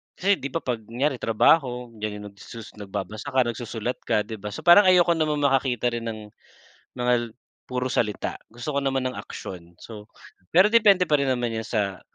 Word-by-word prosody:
kasi 200 Hz, +1 st, +1 dB
di 140 Hz, -, -4 dB
ba 150 Hz, +5 st, -4 dB
'pag 125 Hz, -3 st, -2 dB
kunyari 130 Hz, +3 st, -1 dB
trabaho, 125 Hz, +1 st, +2 dB
yan 105 Hz, -1 st, -4 dB
yung -, -, -9 dB
nagsusus 110 Hz, +2 st, -11 dB
nagbabasa 105 Hz, +5 st, -6 dB
ka, 130 Hz, -, +4 dB
nagsusulat 120 Hz, 0 st, -4 dB
ka, 105 Hz, -, +2 dB
di 110 Hz, +1 st, -7 dB
ba? 105 Hz, +1 st, -6 dB
So, -, -, -6 dB
parang 175 Hz, +4 st, +7 dB
ayoko 180 Hz, -1 st, +5 dB
namang 150 Hz, -2 st, 0 dB
makakita 130 Hz, -3 st, +1 dB
rin 120 Hz, -1 st, -4 dB
ng 110 Hz, -1 st, -4 dB, 0.8 s
mga 120 Hz, -2 st, 0 dB, 0.3 s
puro 125 Hz, 0 st, -2 dB
salita, 105 Hz, -3 st, -1 dB, 0.2 s
gusto 120 Hz, +6 st, -6 dB
ko -, -, +1 dB
naman 135 Hz, -1 st, 0 dB
ng -, -, -10 dB
aksyon. 85 Hz, -2 st, -9 dB
So, 105 Hz, -2 st, -11 dB, 0.4 s
pero 185 Hz, +4 st, +6 dB
depende 205 Hz, -5 st, +5 dB
pa 155 Hz, -, +1 dB
rin 140 Hz, -, 0 dB
naman 120 Hz, -2 st, -1 dB
yan 110 Hz, -1 st, -4 dB
sa 100 Hz, -5 st, -2 dB
120 Hz, 190 wpm, -24 LUFS, 110-140 Hz, 0.8 s, parang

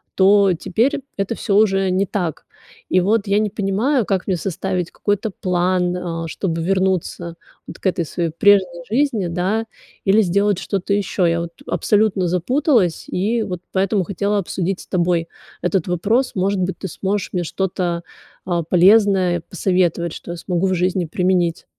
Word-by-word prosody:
то 195 Hz, 0 st, +5 dB
теперь 225 Hz, -, 0 dB, 0.2 s
это 195 Hz, +3 st, -1 dB
всё 200 Hz, -3 st, -1 dB
уже 195 Hz, -3 st, +3 dB
не 190 Hz, +2 st, +1 dB
так. 175 Hz, -5 st, -3 dB, 0.4 s
И 185 Hz, -, +4 dB
вот 210 Hz, +3 st, +1 dB
я 200 Hz, +1 st, +3 dB
не 215 Hz, -1 st, 0 dB
понимаю, 215 Hz, +6 st, 0 dB
как 195 Hz, -1 st, -1 dB
мне 185 Hz, -, +1 dB
составить 185 Hz, 0 st, -3 dB
какой-то 205 Hz, +1 st, -1 dB
план, 180 Hz, -1 st, 0 dB, 0.3 s
э, -, -, -5 dB
чтобы 165 Hz, 0 st, -3 dB
вернуться 185 Hz, -2 st, -1 dB, 0.3 s
вот -, -, -10 dB
к -, -, -22 dB
этой 175 Hz, -1 st, -1 dB
своей 170 Hz, +1 st, -2 dB
прежней 180 Hz, -1 st, +3 dB
жизни, 235 Hz, -8 st, +1 dB
да, 190 Hz, +6 st, -1 dB, 0.4 s
или 200 Hz, +3 st, +4 dB
сделать 200 Hz, +1 st, +1 dB
что-то 200 Hz, 0 st, -2 dB
ещё? 195 Hz, -2 st, 0 dB
Я 170 Hz, 0 st, +2 dB
вот 170 Hz, 0 st, -6 dB
абсолютно 205 Hz, -4 st, +1 dB
запуталась 200 Hz, -, +1 dB
и 220 Hz, +5 st, 0 dB
вот 180 Hz, -3 st, -5 dB
поэтому 195 Hz, +1 st, +1 dB
хотела 200 Hz, +2 st, -1 dB
обсудить 190 Hz, 0 st, -3 dB
с -, -, -14 dB
тобой 175 Hz, -2 st, 0 dB, 0.3 s
этот 180 Hz, -1 st, 0 dB
вопрос. 215 Hz, +9 st, +1 dB
Может 190 Hz, +1 st, 0 dB
быть, 185 Hz, +1 st, -2 dB
ты 190 Hz, -, -5 dB
сможешь 195 Hz, +4 st, -2 dB
мне 175 Hz, -1 st, 0 dB
что-то, 175 Hz, -1 st, -2 dB, 0.4 s
а, 175 Hz, -2 st, 0 dB
полезное 185 Hz, 0 st, +4 dB
посоветовать, 175 Hz, -3 st, 0 dB
что 175 Hz, -, -8 dB
я 175 Hz, -, -5 dB
смогу 180 Hz, +1 st, -1 dB
в 185 Hz, -, +1 dB
жизни 180 Hz, 0 st, 0 dB
применить? 175 Hz, 0 st, 0 dB
190 Hz, 160 wpm, -20 LUFS, 175-200 Hz, 0.4 s, то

